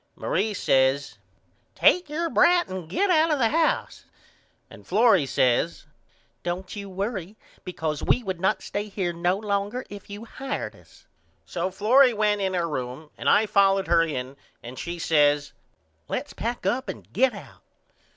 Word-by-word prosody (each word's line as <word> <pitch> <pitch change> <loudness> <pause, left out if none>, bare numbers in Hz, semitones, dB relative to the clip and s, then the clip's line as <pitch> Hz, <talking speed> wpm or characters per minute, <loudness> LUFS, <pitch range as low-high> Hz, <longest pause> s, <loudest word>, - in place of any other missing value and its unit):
Marie 210 +1 -1
says 135 -2 +1 0.6
Take 360 -3 +3
your 330 +3 -1
brat 350 0 +4
and 185 -4 -6
get 385 - +1
out 320 -1 +4
of 300 - +2
the 230 -4 +2
house. 325 +3 0 0.6
And - - -15
Florrie 200 - +4
says 130 +7 +1 0.6
Don't 180 +3 -4
you 200 -1 -7
worry 195 0 -4 0.3
because 160 -4 -4
we 250 - +1
would 190 -4 -4
not 190 - +1
stay 205 +1 -4
here 190 -3 -2
no 175 +2 0
longer 205 +4 -2
if 205 0 -10
you 205 +3 -8
hired 270 +3 -5
us. - - -21 0.4
So 175 +2 -3
Florrie 235 +6 +4
went 210 -1 +1
in 190 -1 -1
her 170 -1 0
room 130 +1 -5
and - - -1
I 220 - +5
followed 195 -1 +3
her 170 -1 +5
in 140 -4 -3 0.3
and 120 +2 -9
she 175 0 -5
says 145 -3 +2 0.5
Let's - - -4
pack 235 +2 -4
up 260 +2 -1
and - - -9
get 265 0 +2
out. - - -12
195 Hz, 160 wpm, -25 LUFS, 170-225 Hz, 0.6 s, I